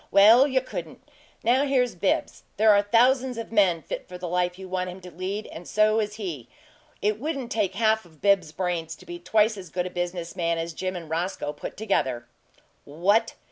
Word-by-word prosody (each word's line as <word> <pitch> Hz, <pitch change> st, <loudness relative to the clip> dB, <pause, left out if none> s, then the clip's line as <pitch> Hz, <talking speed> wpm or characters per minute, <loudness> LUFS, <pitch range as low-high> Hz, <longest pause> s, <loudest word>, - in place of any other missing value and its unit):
Well, 225 Hz, +7 st, +7 dB
you 260 Hz, -2 st, +1 dB
couldn't! 170 Hz, -, -8 dB, 0.4 s
Now 250 Hz, +4 st, +3 dB
here's 260 Hz, -4 st, +1 dB
Bibbs. 185 Hz, +2 st, -1 dB, 0.2 s
There 215 Hz, +1 st, +6 dB
are 205 Hz, -1 st, +5 dB
thousands 245 Hz, +4 st, +3 dB
of 230 Hz, -1 st, -6 dB
men 185 Hz, -7 st, +3 dB
fit -, -, -6 dB
for 180 Hz, -, -7 dB
the 180 Hz, 0 st, -5 dB
life 180 Hz, +1 st, 0 dB
you 190 Hz, 0 st, -9 dB
want 185 Hz, 0 st, -2 dB
him 180 Hz, +1 st, -8 dB
to 180 Hz, 0 st, -11 dB
lead 190 Hz, +5 st, -4 dB
and 170 Hz, +1 st, -9 dB
so 215 Hz, +1 st, +3 dB
is 210 Hz, -1 st, -2 dB
he. 165 Hz, -, -6 dB, 0.5 s
It 210 Hz, +1 st, +1 dB
wouldn't 275 Hz, -3 st, -4 dB
take 200 Hz, -4 st, 0 dB
half 220 Hz, 0 st, +2 dB
of 160 Hz, -4 st, -20 dB
Bibbs's 195 Hz, -6 st, +3 dB
brains 170 Hz, -2 st, -3 dB
to -, -, -17 dB
be 175 Hz, 0 st, -7 dB
twice 215 Hz, +4 st, +2 dB
as 185 Hz, -3 st, -9 dB
good 180 Hz, +2 st, -2 dB
a 185 Hz, -, -5 dB
business 175 Hz, -1 st, -4 dB
man 170 Hz, -1 st, 0 dB
as 165 Hz, 0 st, -3 dB
Jim 185 Hz, +3 st, -3 dB
and 170 Hz, -2 st, -7 dB
Roscoe 165 Hz, -2 st, -2 dB
put 145 Hz, -, -8 dB
together." 130 Hz, -, -1 dB, 0.6 s
"WHAT!" 180 Hz, +10 st, +1 dB
190 Hz, 205 wpm, -25 LUFS, 175-220 Hz, 0.6 s, Well